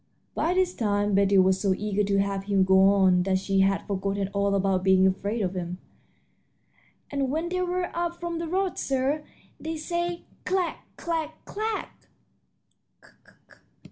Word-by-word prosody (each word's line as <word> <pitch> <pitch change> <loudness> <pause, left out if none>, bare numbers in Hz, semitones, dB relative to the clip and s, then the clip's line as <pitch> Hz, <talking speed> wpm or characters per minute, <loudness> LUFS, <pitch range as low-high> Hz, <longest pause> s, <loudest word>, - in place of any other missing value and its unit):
By 350 +2 0
this 370 -1 +2
time 205 -2 0
Betty 200 0 +4
was 190 0 +4
so 195 -2 +2
eager 210 0 0
to 200 0 +1
have 195 0 -1
him 200 -2 +3
go 190 0 +5
on 190 -2 +4
that 190 +1 +1
she 195 +1 0
had 195 0 +2
forgotten 195 0 -2
all 200 0 0
about 195 -1 +1
being 190 0 +5
afraid 200 +4 0
of 185 -1 -1
him. 180 -1 -4 1.3
"And 275 -2 -1
when 320 +5 -1
they 365 0 -1
whir 360 0 -1
up 345 0 -2
from 340 -1 -3
the 335 - -3
road, 375 +2 -1
sir, 275 +3 0 0.4
they 320 0 -4
say, 345 +2 -3 0.2
'Clack! 370 -2 -1 0.2
clack! 320 -2 -3
clack!'" 435 +1 -5
205 Hz, 155 wpm, -26 LUFS, -, 1.3 s, go